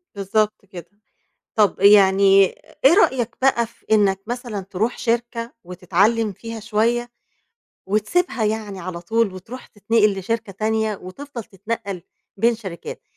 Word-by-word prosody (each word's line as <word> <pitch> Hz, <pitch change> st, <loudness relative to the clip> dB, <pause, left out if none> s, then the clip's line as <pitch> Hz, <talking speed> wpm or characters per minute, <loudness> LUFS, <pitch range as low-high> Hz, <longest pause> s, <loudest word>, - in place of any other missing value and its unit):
بالضبط 205 Hz, +1 st, -1 dB
كده، 175 Hz, -3 st, -11 dB, 0.7 s
طَب 210 Hz, -3 st, +2 dB
يعني 195 Hz, 0 st, +6 dB, 0.4 s
إيه 275 Hz, -, +8 dB
رأيك 255 Hz, -, +2 dB
بقى 245 Hz, -3 st, +3 dB
في 230 Hz, -, -26 dB
إنَّك 200 Hz, -3 st, +3 dB
مثلًا، 240 Hz, -4 st, -4 dB
تروح 200 Hz, +5 st, -2 dB
شركة 235 Hz, 0 st, -2 dB
وتتعلّم 195 Hz, +5 st, +1 dB
فيها 225 Hz, +3 st, -8 dB
شوية 230 Hz, +3 st, 0 dB, 0.8 s
وتسيبها 220 Hz, -, 0 dB
يعني 210 Hz, -2 st, -3 dB
على 170 Hz, -1 st, -6 dB
طول، 220 Hz, +3 st, 0 dB
وتروح 230 Hz, +8 st, -10 dB
تتنقل 210 Hz, -1 st, +1 dB
لشركة 220 Hz, +2 st, -3 dB
تانية 220 Hz, +1 st, -1 dB
وتفضل 240 Hz, +6 st, -8 dB
تتنقل 200 Hz, -2 st, -5 dB, 0.3 s
بين 230 Hz, +4 st, +3 dB
شركات؟ 190 Hz, -7 st, -8 dB
215 Hz, 125 wpm, -21 LUFS, 195-230 Hz, 0.8 s, إيه